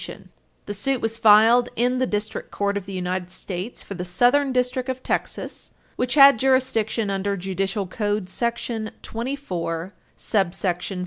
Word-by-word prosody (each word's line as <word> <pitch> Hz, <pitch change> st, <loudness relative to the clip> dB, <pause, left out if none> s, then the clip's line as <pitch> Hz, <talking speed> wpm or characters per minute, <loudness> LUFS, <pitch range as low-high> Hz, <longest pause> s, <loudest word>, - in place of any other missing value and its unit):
[Footnote -, -, -9 dB
3] -, -, -22 dB, 0.3 s
The 205 Hz, -, -4 dB
suit 255 Hz, +6 st, -1 dB
was 225 Hz, 0 st, -1 dB
filed 225 Hz, +2 st, +6 dB
in 250 Hz, +2 st, +1 dB
the 255 Hz, -, +1 dB
District 210 Hz, +1 st, -3 dB
Court 200 Hz, 0 st, -1 dB
of 200 Hz, -2 st, -4 dB
the 195 Hz, -, -6 dB
United 180 Hz, 0 st, -3 dB
States 185 Hz, +4 st, -6 dB
for -, -, -7 dB
the 180 Hz, -2 st, -5 dB
Southern 245 Hz, +10 st, +3 dB
District 250 Hz, +1 st, 0 dB
of 260 Hz, 0 st, -4 dB
Texas, -, -, -4 dB, 0.2 s
which 250 Hz, +1 st, -1 dB
had 275 Hz, -4 st, +8 dB
jurisdiction 240 Hz, -5 st, +1 dB
under 200 Hz, +1 st, -1 dB
Judicial 195 Hz, +2 st, -2 dB
Code 205 Hz, +1 st, -2 dB
§ 230 Hz, +2 st, -3 dB
24, 195 Hz, -, -4 dB, 0.2 s
subsection 185 Hz, -1 st, -1 dB
14. -, -, -4 dB
215 Hz, 165 wpm, -23 LUFS, 190-250 Hz, 0.3 s, had